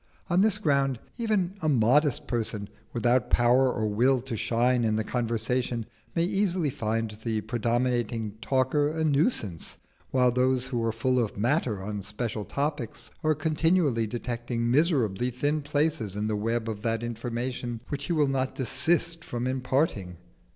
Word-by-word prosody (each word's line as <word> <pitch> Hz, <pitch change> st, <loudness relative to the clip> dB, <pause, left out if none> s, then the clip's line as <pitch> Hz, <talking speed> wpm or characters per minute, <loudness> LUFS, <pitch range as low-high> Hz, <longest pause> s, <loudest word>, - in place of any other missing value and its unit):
On 175 Hz, +2 st, +4 dB
this 215 Hz, -1 st, +4 dB
ground 140 Hz, -4 st, +1 dB, 0.2 s
even 210 Hz, -6 st, +1 dB
a 155 Hz, -, +1 dB
modest 135 Hz, +3 st, +3 dB
person, 110 Hz, -4 st, -2 dB, 0.2 s
without 125 Hz, +1 st, +2 dB
power 125 Hz, +2 st, +4 dB
or 110 Hz, -3 st, -1 dB
will 120 Hz, +5 st, +3 dB
to 125 Hz, -2 st, -5 dB
shine 120 Hz, +3 st, +1 dB
in 110 Hz, -1 st, +1 dB
the 110 Hz, -, 0 dB
conversation, 120 Hz, 0 st, -1 dB, 0.3 s
may 165 Hz, -, +2 dB
easily 180 Hz, -4 st, +1 dB
find 115 Hz, -1 st, -2 dB
the 110 Hz, -2 st, -1 dB
predominating 120 Hz, -1 st, -1 dB
talker 135 Hz, +3 st, +2 dB
a 160 Hz, +1 st, -2 dB
nuisance, 140 Hz, -, 0 dB, 0.3 s
while 125 Hz, -1 st, +3 dB
those 130 Hz, +1 st, +2 dB
who 125 Hz, -3 st, -2 dB
are 115 Hz, -, +1 dB
full 125 Hz, +2 st, +1 dB
of 105 Hz, -, -5 dB
matter 115 Hz, -, 0 dB
on 105 Hz, 0 st, -4 dB
special 105 Hz, +1 st, -3 dB
topics 140 Hz, -5 st, -3 dB
are 155 Hz, 0 st, +3 dB
continually 155 Hz, -5 st, +2 dB
detecting 120 Hz, 0 st, -2 dB
miserably 125 Hz, -, +2 dB
thin 145 Hz, +5 st, -1 dB
places 145 Hz, -8 st, 0 dB
in 105 Hz, +1 st, -2 dB
the 110 Hz, 0 st, 0 dB
web 115 Hz, +2 st, -1 dB
of 105 Hz, -2 st, -4 dB
that 115 Hz, 0 st, -1 dB
information 120 Hz, +1 st, -4 dB
which 145 Hz, -1 st, -3 dB
he -, -, -3 dB
will 150 Hz, -3 st, +3 dB
not 135 Hz, -1 st, -1 dB
desist 165 Hz, +6 st, +1 dB
from 120 Hz, -4 st, -4 dB
imparting. 130 Hz, -, -1 dB
125 Hz, 155 wpm, -27 LUFS, 115-145 Hz, 0.3 s, On